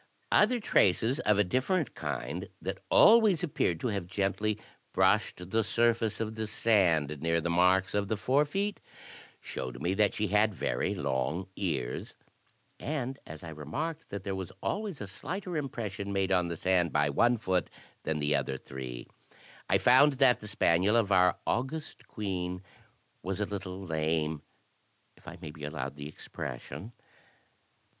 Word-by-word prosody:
Other 240 +4 +4
traces 115 - +3
of 105 -9 +2
a 105 - +5
different 130 - 0
kind, - - -4
that - - -4
always 215 -7 +6
appeared 90 - 0
to 125 - 0
have 100 -5 -3
gently 105 +3 -1 0.3
brushed 90 +1 +2
the 115 0 +3
surface 115 0 +1
of 110 -1 -2
the 110 -1 -3
sand 85 -10 +2
near 85 0 +2
the 85 +1 -1
marks 90 +2 +3
of 100 -1 0
the 110 - -1
forefeet, 150 - +1 0.6
showed 65 -2 -6
me 85 +6 0
that 105 0 +2
she 105 -2 -1
had 105 +1 +3
very - - -1
long 75 +8 -2
ears; 65 -11 -3 0.6
and 135 -3 -3
as 80 +1 -9
I 85 - -7
remarked 145 - -5
that 100 - -5
there 100 - -3
was 95 -2 -5
always 205 - -2
a 100 - -4
slighter 180 - -5
impression 110 -9 -4
made 95 -1 0
on 90 -2 +3
the 85 -1 -4
sand 90 -2 +2
by 75 0 +2
one 120 - +3
foot 95 -4 0 0.3
than 80 - -2
the 75 0 +1
other 65 - -1
three, 65 -2 -7 0.6
I - - +5
found 135 +4 +6
that 130 -2 +4
the 105 - -9
spaniel 100 0 +3
of 110 -4 +2
our 90 -1 +4
august 135 +6 -3
queen 90 -3 -3 0.6
was 95 +2 -3
a 105 - +1
little 95 -2 -5
lame, 80 -2 -1 0.7
if - - -23
I 90 - -8
may 75 - -5
be 75 -1 -12
allowed 70 -3 -4
the 70 0 -7
expression. 75 - -7
100 Hz, 160 wpm, -30 LUFS, 85-115 Hz, 0.7 s, always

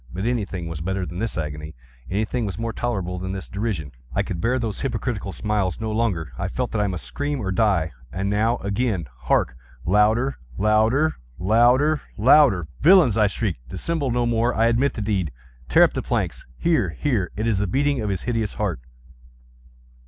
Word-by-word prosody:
But 95 +4 -4
anything 100 -8 -2
was 85 -1 -5
better 95 +2 -2
than 85 +2 -6
this 115 -3 -2
agony! 75 0 -5 0.3
Anything 110 +5 -1
was 95 - -5
more 115 0 -3
tolerable 95 -8 -2
than 95 +1 -4
this 95 -1 -6
derision! 100 - -3 0.2
I - - +2
could 85 - -4
bear 125 +5 +2
those 115 -5 -3
hypocritical 120 -7 -2
smiles 105 -3 -1
no 110 -1 -2
longer! 100 - -1
I - - -1
felt - - -3
that 105 - 0
I 105 - +2
must 90 -3 -4
scream 145 0 -3
or 95 -5 -2
die! 95 -5 +2 0.2
and 95 +5 -2
now—again!—hark! 100 - 0 0.3
louder! 110 +8 +3 0.2
louder! 110 +9 +3 0.2
louder! 120 - +4 0.2
louder! 115 - +5
"Villains!" 170 - +6
I 105 -2 +4
shrieked, 95 - -3
"dissemble 145 - -2
no 120 0 +1
more! 120 +1 +1
I 115 - +3
admit 120 +4 +2
the 110 - -3
deed!—tear 65 - 0
up - - +3
the - - -2
planks!—here, 90 - -1
here!—It 110 - -1
is 110 -4 +1
the 100 - 0
beating 140 +5 +1
of 105 - -2
his 95 -3 -2
hideous 115 -4 -1
heart!" 100 - -2
105 Hz, 170 wpm, -23 LUFS, 90-120 Hz, 0.3 s, Villains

